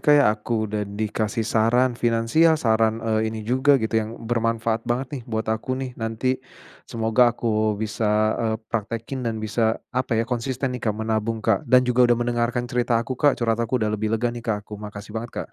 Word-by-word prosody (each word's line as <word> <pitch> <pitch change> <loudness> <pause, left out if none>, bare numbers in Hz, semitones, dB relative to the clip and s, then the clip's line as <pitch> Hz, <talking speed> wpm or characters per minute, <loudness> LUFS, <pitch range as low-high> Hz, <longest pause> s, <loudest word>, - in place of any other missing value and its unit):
Kak 150 - +5
ya. 145 - +5
Aku 110 +1 -2
udah 105 -1 -3
dikasih 110 +2 -2
saran 120 +3 +2
finansial, 120 +8 +3
saran, 110 -4 +2
eee, 110 0 +1
ini 110 -1 -6
juga 130 +4 +4
gitu 110 -2 0
yang 110 +2 -6
bermanfaat 115 -1 -1
banget 125 +2 0
nih - - -13
buat 110 -1 -2
aku 120 +4 -3
nih 130 -1 -4
nanti. 115 +4 -1 0.5
Semoga 115 +1 +3
aku 110 -2 0
bisa, 110 0 -2 0.3
eee, 110 -1 0 0.2
praktekin 115 +4 -3
dan 115 -2 -2
bisa, 110 +1 0 0.2
apa 125 -2 0
ya, 115 - +2
konsisten 125 +2 -2
nih, 125 - -5
Kak, 105 -2 -1
menabung, 110 0 -2
Kak, 110 -4 +1
dan 125 -1 +6
juga 125 0 +4
udah 120 - +4
mendengarkan 120 0 0
cerita 120 -1 0
aku, 120 +3 -2
Kak, 145 -2 +4
curhat 115 -1 0
aku. 115 +2 0
Udah 110 -3 0
lebih 110 0 -1
lega 120 +1 -1
nih, 120 - -6
Kak, 110 -3 -2
aku. 105 -1 -9
Makasih 105 0 -8
banget, 115 +2 -5
Kak. - - -20
115 Hz, 200 wpm, -23 LUFS, 110-120 Hz, 0.5 s, dan